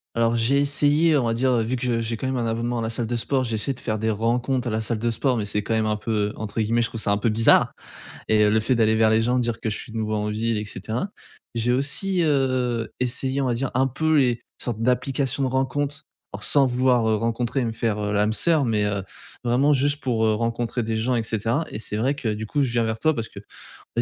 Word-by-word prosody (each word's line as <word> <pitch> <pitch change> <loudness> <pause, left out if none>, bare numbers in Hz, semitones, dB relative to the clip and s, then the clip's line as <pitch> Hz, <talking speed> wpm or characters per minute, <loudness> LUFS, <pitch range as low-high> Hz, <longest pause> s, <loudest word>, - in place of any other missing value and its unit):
Alors 115 0 +2
j'ai 120 +5 +2
essayé, 145 +2 +3
on 130 - +1
va 115 - +1
dire, 130 +3 +1
heu, 120 -2 +2
vu 120 +4 -1
que 125 - -5
je 120 -2 0
j'ai, 115 0 -2
quand 130 - -4
même, 130 0 -1
un 120 - -1
abonnement 115 +1 -2
à - - -2
la 110 - -2
salle 115 0 -2
de 120 - -2
sport, 130 +3 0
j'ai 115 -3 -2
essayé 120 +6 0
de 125 - -9
faire 110 -2 -2
des 110 +1 0
rencontres 120 +4 0
à - - -3
la 110 - -1
salle 110 0 -2
de 115 +1 0
sport 130 +3 0
mais 110 - -1
c'est, 105 0 -2
quand 115 - -2
même, 110 -1 +1
un 105 0 0
peu, 110 +2 -5 0.2
heu, - - -8
entre 110 +1 -3
guillemets, 115 +2 +1
je 115 - +2
trouve 115 - -4
ça 100 - +1
un 100 - +2
peu 105 - -1
«bizarre» 110 +1 +4 0.6
et 110 -1 +4
heu, 105 - +3
le 110 - +3
fait 125 +4 +1
d'aller 110 -2 +3
vers 110 0 +4
les 110 0 +3
gens, 125 +2 +1
dire 120 -2 -1
que 110 - -2
je 110 - -2
suis, - - -7
de 115 - -4
nouveau, 110 -1 -2
en 105 0 -2
ville 110 +2 -1
et 105 - -3
cetera. 110 - -4 0.5
J'ai 115 +1 0
aussi, 170 +8 +1
heu, 130 -6 0
essayé, 130 +2 -1
on 135 - 0
va 125 - +1
dire, 130 +2 -2
un 130 +2 +3
peu 160 +5 0
les 125 -4 +2 0.2
sortes 115 -3 -2
d'applications 135 +2 0
de - - +1
rencontres 135 +2 -1 0.3
or - - -4
sans 140 - +5
vouloir, 125 -2 +2
heu, 110 - +2
rencontrer 115 +4 -1
et - - 0
me 115 - -2
faire, 110 -2 -1
heu, 105 - -2
l'âme 105 +1 +2
sœur 155 +5 +3
mais 110 -4 +1
heu, 100 -1 -2 0.4
vraiment 130 +5 +3
juste 145 +2 +1
pour, 115 -4 0
heu, 110 - +3
rencontrer 115 +2 -2
des 110 0 -2
gens 120 +3 0
et 115 - +1
cetera 115 +8 -1
et - - -5
c'est 105 -1 -5
vrai 130 +6 +1
que, 115 -6 -2
du 110 +1 -5
coup, 145 +7 0
je 130 - 0
viens 120 -1 +1
vers 110 0 -2
toi 155 +4 +2
parce 115 -4 -4
que, - - -11 0.4
on - - -4
115 Hz, 280 wpm, -23 LUFS, 110-130 Hz, 0.6 s, sans